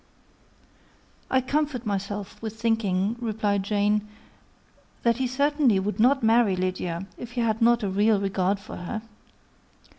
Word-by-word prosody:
"I 260 - +3
comfort 280 -2 -1
myself 205 +1 -4
with 220 0 -6
thinking," 220 -2 0
replied 210 -3 0
Jane, 210 +1 +1 1.0
"that 235 -1 +3
he 260 -1 0
certainly 280 -4 +2
would 205 +3 -3
not 260 +3 +4
marry 225 -3 +4
Lydia, 185 -1 -2
if 240 0 -8
he 245 - -1
had 225 0 0
not 235 0 +4
a - - 0
real 205 +2 +3
regard 195 0 0
for 200 - -9
her. 215 +5 -5
215 Hz, 140 wpm, -25 LUFS, 200-240 Hz, 1.0 s, not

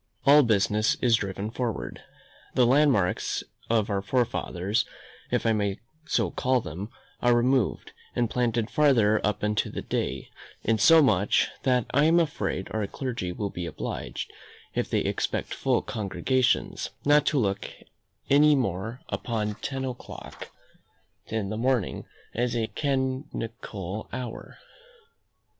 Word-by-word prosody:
All 145 +2 +8
business 110 -2 +2
is 120 -2 +4
driven 100 +1 -4
forward. 115 - -3 0.5
The 125 - +5
landmarks 125 -8 +2 0.3
of 115 -3 +2
our 100 -1 0
fathers, 105 -2 0 0.5
if - - 0
I 115 - +4
may 100 -2 -1 0.3
so 105 -8 +1
call 130 0 +1
them, 100 0 -6 0.3
are 120 0 +4
removed, 125 -1 +1 0.2
and 120 -1 +2
planted 115 -1 0
farther 120 -9 +4
up 105 0 0
into 105 0 +1
the - - -5
day; 65 +1 -3 0.3
insomuch, 115 - +4
that 125 -3 +2
I 145 +3 +4
am 165 +2 +5
afraid 105 - -1
our 110 -2 -1
clergy 120 -7 -4
will 100 +2 -3
be 85 -1 -4
obliged, - - -5 0.4
if - - -1
they - - +1
expect - - -2
full - - +1
congregations, 120 +5 0 0.2
not 145 0 +5
to 150 - +2
look 100 -6 0 0.6
any 150 +2 +6
more 115 -1 -2
upon 105 -3 -2
ten 135 -1 -3
o'clock 125 -2 -8 0.8
in 110 -3 -2
the 110 - -3
morning 125 -3 0 0.3
as 120 0 0
a 115 -1 +1
canonical 125 - -3
hour. 125 -3 -6
115 Hz, 130 wpm, -27 LUFS, 105-130 Hz, 0.8 s, All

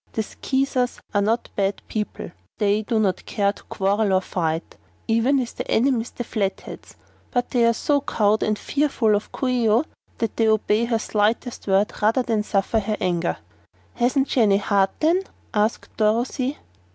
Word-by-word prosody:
The 220 - -1
Skeezers 265 +2 -1
are 205 - +3
not 225 +4 0
bad 195 0 -1
people; 210 -1 -4 0.3
they 205 0 +2
do 220 +1 -1
not 190 -4 0
care 200 -1 +1
to - - -16
quarrel 200 +1 0
and 185 - +2
fight, 165 -3 -2 0.3
even 230 +5 +3
with 250 -3 -2
their - - -4
enemies 240 -1 +2
the 240 - -6
Flatheads; 200 -4 -4 0.3
but 245 -1 -1
they 245 -2 +3
are 230 - +4
so 285 +5 +1
cowed 215 -4 +1
and 215 0 +1
fearful 270 -7 +1
of 205 - -3
Coo 265 - -2
ee 245 -3 +2
oh 225 +6 +4 0.3
that 230 - -2
they 225 - +3
obey 220 +1 +2
her 230 -1 +1
slightest 220 +2 -1
word, 195 +2 +2
rather 225 +5 +3
than 225 -3 0
suffer 210 +1 0
her 210 0 -2
anger." 175 -2 0 0.6
"Hasn't 260 +3 +1
she 250 - +3
any 200 -3 +5
heart, 200 -1 +2
then?" 335 +4 +3 0.3
asked 215 +1 -1
Dorothy. 245 +6 0
220 Hz, 175 wpm, -23 LUFS, 205-245 Hz, 0.6 s, any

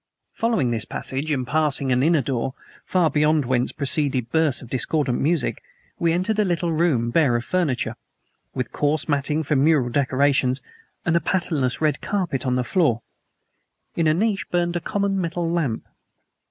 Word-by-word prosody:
Following 225 - 0
this 115 -2 0
passage, 135 +4 -4
and 135 -4 0
passing 145 -1 +1
an 125 0 +3
inner 155 -1 +3
door, 130 +1 -2 0.3
from 175 -4 +2
beyond 150 0 +2
whence 125 0 0
proceeded 140 -4 0
bursts 160 -5 +2
of - - -10
discordant 135 0 0
music, 155 -3 0 0.4
we 170 -1 +2
entered 185 +6 0
a - - +5
little 175 -2 0
room 155 -8 +1
bare 140 -4 +3
of 120 0 -1
furniture, 130 -10 -1 0.6
with 125 -3 -3
coarse 150 +1 0
matting 150 +1 0
for 150 +1 0
mural 140 -3 +3
decorations, 135 0 +2 0.5
and 170 - +2
a - - +5
patternless 155 -7 0
red 150 -3 +1
carpet 170 -10 -2
on 125 - +1
the 125 - +1
floor. 120 - +1 0.9
In 165 -2 +1
a 155 - +4
niche 195 -2 0
burned 175 0 0
a - - +1
common 200 +1 -1
metal 170 0 -2
lamp. 165 -9 -1
150 Hz, 165 wpm, -23 LUFS, 130-170 Hz, 0.9 s, a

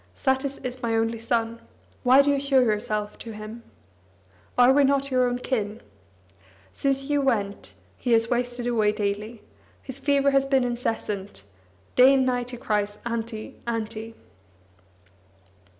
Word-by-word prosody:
Satis 265 0 0
is 255 0 -5
my 230 -2 0
only 225 0 0
son. 230 0 -1 0.4
Why 260 +3 +6
do 285 - +2
you 280 - +1
show 275 -1 +3
yourself 210 -3 -1
to 225 - -8
him? 215 +2 -8 1.0
Are 250 +1 +7
we 285 +1 +5
not 275 0 +1
your 255 -1 +3
own 245 0 -1
kin? 220 -4 -2 0.9
Since 275 -1 0
you 290 -1 +2
went, 210 -7 -1 0.2
he 245 - -2
has 225 0 +4
wasted 245 0 -1
away 220 -4 +2
daily; 210 +2 -3 0.4
his 265 0 -8
fever 280 0 +2
has 275 0 +2
been 270 -2 +3
incessant; 215 - -3 0.5
day 260 +2 +7
and 265 -1 +3
night 245 -1 -1
he 245 - -6
cries: 210 -2 -1
'Auntie, 230 -1 -5
Auntie.' 225 -1 -4
240 Hz, 145 wpm, -25 LUFS, 220-265 Hz, 1.0 s, Are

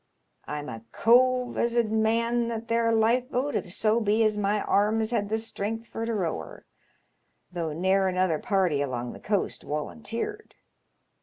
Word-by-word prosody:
I'm 150 0 -5
a 115 -4 -7
cove 250 +1 +3
as 235 0 +1
'ud 230 -2 +2
man 230 +2 +1
that 230 0 -5
there 230 0 +2
lifeboat 250 +5 +1
if 180 - -2
so 215 +4 +2
be 215 0 +2
as 215 -1 +2
my 205 0 0
arms 220 +2 +1
had 205 -4 0
the 220 - +1
strength 225 0 -4
for 225 0 -4
to 230 - -1
row 175 - -1
her, 80 - -11 0.9
though 170 -3 -3
ne'er 190 +4 +2
another 185 -4 +1
party 190 -10 +1
along 125 -3 -3
the - - -11
coast 205 -2 -1
woulunteered. 230 - -5
220 Hz, 160 wpm, -27 LUFS, 185-230 Hz, 0.9 s, cove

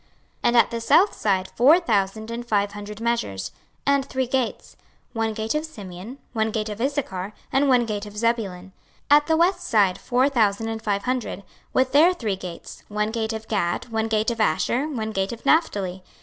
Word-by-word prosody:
26:048:033 - - -36 0.4
And 240 0 +4
at 235 - +5
the 230 0 -3
south 375 - +4
side 190 -3 0
four 290 +9 +6
thousand 220 - -1
and 235 +1 -4
five 205 -3 0
hundred 210 0 -8
measures: 230 - -2 0.3
and 280 -1 +3
three 260 -1 -2
gates; 255 -1 -2 0.4
one 225 -1 0
gate 220 +1 -2
of 300 0 -1
Simeon, 205 - -9 0.2
one 220 -1 +1
gate 215 0 -2
of 210 +1 -6
Issachar, 215 -8 -2 0.2
one 265 -3 +3
gate 210 -2 -4
of 210 0 -11
Zebulun. 205 -5 -1 0.4
26:048:034 290 - +10
At 295 - -14
the 320 -1 +3
west 360 +2 +2
side 205 - +2
four 255 +2 +2
thousand 225 -5 +1
and 225 0 -4
five 200 -2 -1
hundred, 250 -6 -2 0.3
with 260 0 +2
their 325 +6 +5
three 220 - -2
gates; 180 -3 -9
one 210 +1 -1
gate 220 -1 -2
of 220 0 -6
Gad, 195 +1 -1
one 225 -1 -1
gate 220 +1 +1
of 230 -1 -3
Asher, 235 - +1
one 225 -7 -3
gate 195 -2 -1
of 235 - -11
Naphtali. 200 - +1
225 Hz, 195 wpm, -24 LUFS, 205-255 Hz, 0.4 s, 26:048:034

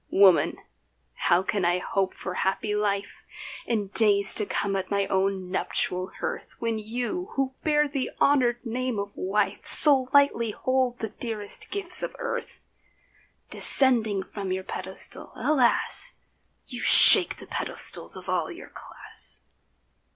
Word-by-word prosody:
Woman, 190 -3 +2 0.6
how 175 - -1
can 195 0 -4
I 175 +1 0
hope 190 +1 -4
for 185 - -8
happy 195 +3 -4
life 205 -1 -5 0.4
In 210 -4 -4
days 200 -2 +1
to 210 - -2
come 200 -1 -4
at 190 -1 -6
my 200 -1 -2
own 190 -1 -4
nuptial 185 0 -2
hearth, - - -8
When 230 -1 -5
you 245 - -6
who 270 -1 -3
bear 300 -1 0
the 275 -2 -6
honoured 250 -4 0
name 250 0 -5
of 200 0 -7
wife 200 +2 -4
So 275 -4 +5
lightly 280 -6 0
hold 255 0 -3
the 220 -2 -7
dearest 215 -4 -7
gifts 390 -3 0
of - - -7
earth? 485 -1 -8 0.9
Descending 225 -7 0
from 195 -1 -9
your 190 0 -5
pedestal, 190 0 -6
alas! 285 - +3 0.5
You 245 -2 -5
shake - - +11
the - - -12
pedestals - - 0
of - - -11
all - - -3
your - - -13
class. - - -1
215 Hz, 140 wpm, -23 LUFS, 195-255 Hz, 0.9 s, shake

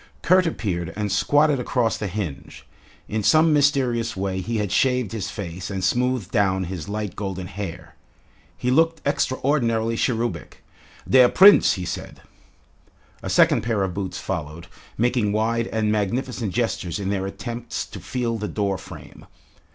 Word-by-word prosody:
Kurt 185 0 +4
appeared 85 - -3
and 105 -1 -2
squatted 145 +8 +3
across 120 -2 0
the 105 - -4
hinge. 95 -7 -6 0.4
In 110 0 -2
some 155 +8 +4
mysterious 125 -6 +1
way 95 -1 -2
he 115 +5 -3
had 105 -3 -2
shaved 125 -2 +1
his 105 -4 -4
face 90 -4 -6
and 95 -2 -4
smoothed 125 0 0
down 95 -3 +1
his 90 0 -6
light 105 -1 -4
golden 95 -3 -4
hair. 95 -3 -7 0.6
He 125 - -1
looked 165 +3 +3
extraordinarily 125 -5 0
cherubic. 115 0 -2 0.4
"Der 125 -2 +6
Prinz," 200 +2 +7
he 90 -2 -4
said. - - -7 1.0
A - - -5
second - - +4
pair 110 -4 0
of 95 -2 -2
boots 95 -1 -4
followed, 85 -4 -5 0.3
making 120 -3 +1
wide 115 +2 0
and 110 -1 0
magnificent 110 +1 -1
gestures 105 -6 -2
in 95 -1 -3
their 95 -1 -1
attempts 115 +5 -5
to - - -10
feel 120 -2 -3
the 105 - -3
door 100 -3 -2
frame. - - -12
110 Hz, 150 wpm, -23 LUFS, 95-125 Hz, 1.0 s, Prinz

